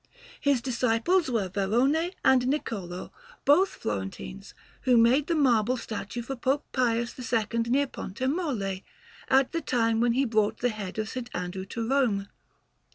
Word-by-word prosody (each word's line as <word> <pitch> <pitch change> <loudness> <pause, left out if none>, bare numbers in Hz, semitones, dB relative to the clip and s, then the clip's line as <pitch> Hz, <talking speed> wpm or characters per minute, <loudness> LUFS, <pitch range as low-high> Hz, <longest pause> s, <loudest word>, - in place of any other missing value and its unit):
His 280 -4 +1
disciples 255 +7 +1
were 225 -6 0
Varrone 245 - +1
and 265 -1 +6
Niccolò, 220 -9 -3 0.3
both 360 +8 +5
Florentines, 95 -12 -6 0.3
who 250 -2 +4
made 250 +6 +4
the 335 - +1
marble 250 -4 +3
statue 225 +1 -5
for 270 +3 -5
Pope 265 +4 0
Pius 235 -2 0
II 230 -2 -1
near 275 +4 +3
Pontemolle, 255 - -3 0.5
at 265 0 +4
the 335 - -2
time 230 -4 +1
when 240 -1 +3
he 270 +3 +2
brought 215 -2 +1
the 245 - +1
head 210 -4 -6
of 215 +2 -3
S. 255 -2 -3
Andrew 180 +1 -4
to 225 +3 -4
Rome. 230 -7 +1
235 Hz, 150 wpm, -27 LUFS, 210-265 Hz, 0.5 s, and